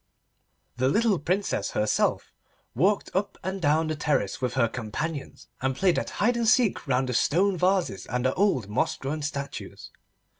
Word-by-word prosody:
The 130 +1 +2
little 215 +3 +2
Princess 180 - -1
herself 105 0 0 0.4
walked 200 +3 +1
up 195 +1 -1
and 190 0 -3
down 155 +1 +3
the 155 0 -2
terrace 145 -10 -1
with 125 -1 -1
her 120 -3 +3
companions, 135 +7 -5
and 130 0 0
played 185 +3 +2
at - - -4
hide 240 +4 +2
and 235 -1 0
seek 240 - +3
round 130 0 +1
the - - -1
stone 185 +10 +2
vases 180 - 0
and 125 +1 -2
the 130 - +2
old 185 - +1
moss 105 - 0
grown 150 +3 -4
statues. 140 -1 -6
155 Hz, 165 wpm, -26 LUFS, 130-195 Hz, 0.4 s, down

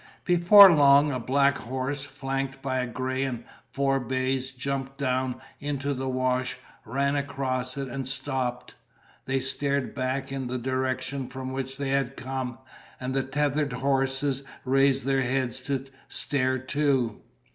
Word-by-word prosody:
Before 180 +2 +9
long 145 0 +6
a 130 - -2
black 140 +3 +2
horse, 130 +3 -3
flanked 135 -1 -4
by 130 -1 0
a 125 - -1
gray 130 +2 -2
and 130 -4 -3 0.3
four 135 0 +1
bays, 130 +1 -1
jumped 135 +1 -4
down 130 -2 -1 0.2
into 145 -1 -2
the 130 0 -3
wash, 130 0 0 0.3
ran 140 +5 0
across 135 -2 -2
it, 135 -1 -3
and 135 0 -4
stopped. 130 -2 -3 0.5
They 135 0 0
stared 140 +1 -1
back 130 +1 -2
in 135 -2 -3
the 125 +1 -2
direction 130 +1 -2
from 130 0 -6
which 135 0 -4
they 140 -1 -2
had 135 -1 0
come, 130 -1 -4 0.4
and 130 0 -3
the 135 - +2
tethered 145 +1 0
horses 135 +1 0 0.2
raised 135 +1 +3
their 135 -1 +2
heads 130 -1 0
to 135 -1 -1 0.2
stare 130 -2 0
too. 130 -3 0
135 Hz, 145 wpm, -27 LUFS, 130-140 Hz, 0.5 s, Before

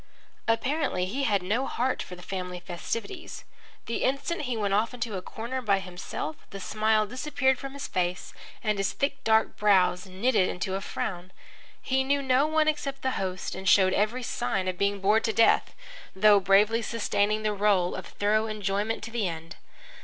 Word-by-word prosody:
Apparently 250 - +1
he 265 +9 -2
had 200 -5 +1
no 225 +9 0
heart 255 +2 -1
for 180 - -8
the 180 - -13
family 180 -1 -5
festivities. 230 - -5 0.4
The 230 - -2
instant 280 +6 0
he 240 - -1
went 200 -2 0
off 220 +4 +1
into 230 -4 -3
a 185 - -3
corner 235 +7 -5
by 200 -5 +2
himself 180 -4 -5
the 195 - -8
smile 215 +2 +1
disappeared 260 +2 0
from 275 0 -7
his 280 0 -5
face, 180 0 -2 0.3
and 210 -2 0
his 195 -1 0
thick 280 0 -2
dark 220 0 +2
brows 190 -3 +3
knitted 190 +1 +1
into 190 +1 -3
a 195 - -2
frown. 180 -2 -4 0.5
He 265 0 +1
knew 280 +1 +1
no 265 +2 +3
one 310 0 +2
except 285 -3 -2
the 260 - +1
host 185 -1 -3
and 190 0 -1
showed 190 -1 +5
every 225 +5 0
sign 195 -5 -1
of 185 - -1
being 200 0 0
bored 210 +3 +3
to 220 - 0
death, 225 +2 +3 0.4
though 205 +1 +6
bravely 205 +4 +4
sustaining 215 -2 0
the 215 -1 +1
role 200 -3 +2
of 185 - -6
thorough 215 +2 +1
enjoyment 210 +1 -2
to 225 - -7
the 225 -4 0
end. 165 -1 -7
210 Hz, 185 wpm, -27 LUFS, 190-250 Hz, 0.5 s, though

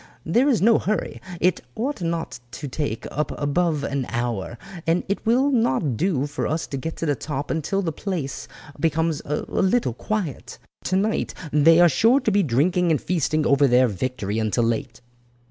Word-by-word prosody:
There 240 - +3
is 235 -8 +2
no 230 +1 +5
hurry. 215 +2 -2 0.2
It 180 +1 +2
ought 255 -1 -3
not 165 -6 -3
to 145 - -6
take 130 -5 -3
up 150 +2 -1
above 150 +1 0
an 140 -2 -2
hour, 120 -2 -3 0.3
and 165 +2 +2
it 200 - -2
will 260 +5 +3
not 225 - +1
do 150 - 0
for 145 - -3
us 160 +2 -1
to - - 0
get 160 +5 -4
to - - -3
the 145 - +2
top 145 0 -4
until 165 +5 -1
the 165 - -1
place 160 -5 -4 0.3
becomes 160 -1 0
a 150 +1 -1
little 195 - +1
quiet. 185 - -4 0.3
Tonight 195 +4 0 0.2
they 160 +3 +6
are 175 - +8
sure 230 - +4
to 220 - 0
be 205 0 +3
drinking 170 +5 +2
and 155 -4 +2
feasting 155 -3 0
over 140 0 +4
their 125 0 +5
victory 105 0 -2
until 110 +2 +1
late." 115 +1 -2
160 Hz, 180 wpm, -23 LUFS, 135-190 Hz, 0.3 s, are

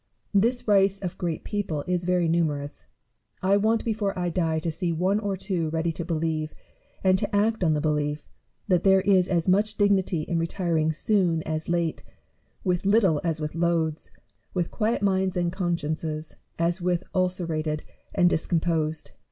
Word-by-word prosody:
This 230 +5 +2
race 195 -1 +4
of 185 -2 -5
great 170 -3 -2
people 195 -8 -2
is 180 -1 -1
very 180 -1 +2
numerous. 145 - -1 0.6
I 195 +1 +4
want 220 +2 +2
before 210 -3 -1
1 175 -1 -1
die 165 -2 0
to 160 +1 -2
see 170 +2 -2
one 185 +5 +1
or 200 -2 -2
two 175 -4 -2
ready 165 +1 0
to 165 +2 -4
believe, 160 -2 -2 0.5
and 185 -1 +4
to 205 +1 -2
act 215 0 +2
on 160 -3 +3
the 150 - -1
belief, 150 -1 -1 0.4
that 180 -4 +3
there 190 -1 +5
is 185 -2 +3
as 175 -2 0
much 210 +3 +2
dignity 195 -5 +2
in 170 +1 -1
retiring 165 -2 0
soon 170 -1 +1
as 155 +1 -3
late, 170 -2 0 0.6
with 180 -2 0
little 195 -6 +3
as 165 -2 -1
with 150 -1 -3
loads, 165 -2 0 0.5
with 175 -2 -1
quiet 220 -1 0
minds 190 -2 +1
and 175 -1 +1
consciences 160 -3 -3 0.2
as 170 +2 0
with 180 0 0
ulcerated 165 -5 -1 0.3
or - - +3
discomposed. 165 -2 +1
175 Hz, 165 wpm, -26 LUFS, 160-195 Hz, 0.6 s, there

